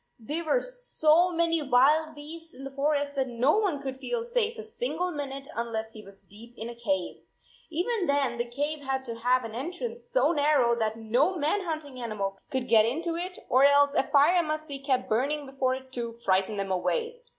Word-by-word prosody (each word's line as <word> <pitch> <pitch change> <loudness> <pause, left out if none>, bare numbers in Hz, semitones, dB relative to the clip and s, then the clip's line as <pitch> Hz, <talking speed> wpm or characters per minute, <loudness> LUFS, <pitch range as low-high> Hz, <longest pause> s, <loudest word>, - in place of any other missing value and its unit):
There 295 +9 -4
were - - +2
so 360 -9 +2
many 335 -1 +1
wild 295 +4 +3
beasts 325 +1 -9
in 265 - -10
the 275 - -6
forest 285 +1 0
that 265 -2 0
no 250 - +2
one 345 -10 -1
could 265 -1 -5
feel 460 - -2
safe 475 -1 0
a 445 - -6
single 440 -5 -3
minute 275 -3 -5
unless 225 -1 -3
he 215 - -10
was 195 -1 -13
deep 230 +4 -15
in 225 +2 -5
a - - -6
cave. 195 -6 -2 0.5
Even 360 +4 -1
then 275 -4 +1
the 240 0 -2
cave 290 +4 -2
had 265 -1 -2
to 235 - -2
have 245 +2 +1
an 225 - -7
entrance 370 - -5
so - - +3
narrow 285 -6 +3
that 220 -1 -1
no 245 +11 +1
man 315 +7 +1
hunting 310 -7 -5
animal 200 -4 -3
could 260 -2 -2
get 220 -1 +6
into 330 +9 -1
it, 360 +2 -4
or 260 - +4
23 280 - +8
else 285 0 +4
a - - +4
fire 310 +5 +5
must 310 -1 -3
be 280 -2 -6
kept 265 -2 0
burning 280 +6 0
before 265 -1 0
it 260 0 -11
to 235 -2 -3
frighten 195 -2 0
them 195 -1 -2
away. 465 - -1
280 Hz, 205 wpm, -28 LUFS, 235-330 Hz, 0.5 s, 23